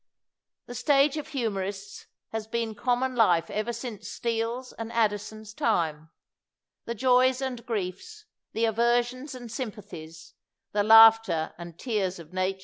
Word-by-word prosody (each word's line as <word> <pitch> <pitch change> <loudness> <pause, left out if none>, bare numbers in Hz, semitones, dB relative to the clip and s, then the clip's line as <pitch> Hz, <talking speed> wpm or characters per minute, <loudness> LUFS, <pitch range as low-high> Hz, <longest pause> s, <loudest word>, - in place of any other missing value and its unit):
The 245 - -9
stage 275 +3 +3
of 300 - -5
humorists 200 -6 -4 0.2
has 225 -1 -5
been 230 -1 -2
com 245 +3 0
mon 260 0 -1
life 175 -8 +3
ever 215 +3 -2
since 230 -3 -7
Steele 230 +2 -2
's 250 - -14
and 225 0 -7
Addison 215 -1 -1
's 215 - -11
time; 160 -9 -1 0.8
the 235 - -4
joys 255 +2 +3
and 255 -3 -4
griefs, 230 - -5 0.3
the 225 +1 +1
aversions 240 +4 0
and 240 -3 -9
sympathies, 195 - -8 0.4
the 205 - +1
laughter 220 -6 +6
and 170 -1 -9
tears 200 -5 -2
of 170 0 -13
nature. 185 +1 -1
225 Hz, 145 wpm, -27 LUFS, 195-245 Hz, 0.8 s, laughter